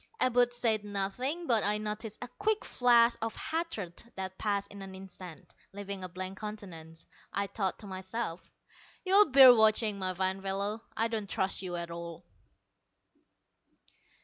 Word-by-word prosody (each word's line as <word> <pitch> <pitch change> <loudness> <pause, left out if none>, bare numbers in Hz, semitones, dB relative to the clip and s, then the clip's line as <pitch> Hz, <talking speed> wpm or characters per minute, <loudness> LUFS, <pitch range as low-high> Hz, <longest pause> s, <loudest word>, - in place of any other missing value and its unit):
Abud 245 -1 +3
said 230 -3 +1
nothing, 210 - -3
but 230 -7 +3
I 210 +1 +2
noticed 215 0 -5
a - - -6
quick 425 - -1
flash 240 -1 +4
of 225 0 -3
hatred 315 - -4
that 190 0 -6
passed 200 -2 -1
in 200 - -10
an 190 -1 -8
instant, 185 -3 -11 0.2
leaving 200 -1 -6
a 185 - -5
blank 185 +2 -6
countenance. 170 -7 -8 0.3
I 200 - -1
thought 195 -1 -2
to 215 - -8
myself, 190 -1 -5 0.6
"You'll 395 +1 +7
bear 260 -1 +10
watching, 215 -2 +3
my 185 -1 -2
fine 190 +1 -1
fellow. 200 +3 -2 0.2
I 225 - +2
don't 220 -3 -4
trust 190 0 0
you 180 -2 -5
at 170 -1 -5
all." 170 -1 -8
205 Hz, 150 wpm, -31 LUFS, 190-230 Hz, 0.6 s, bear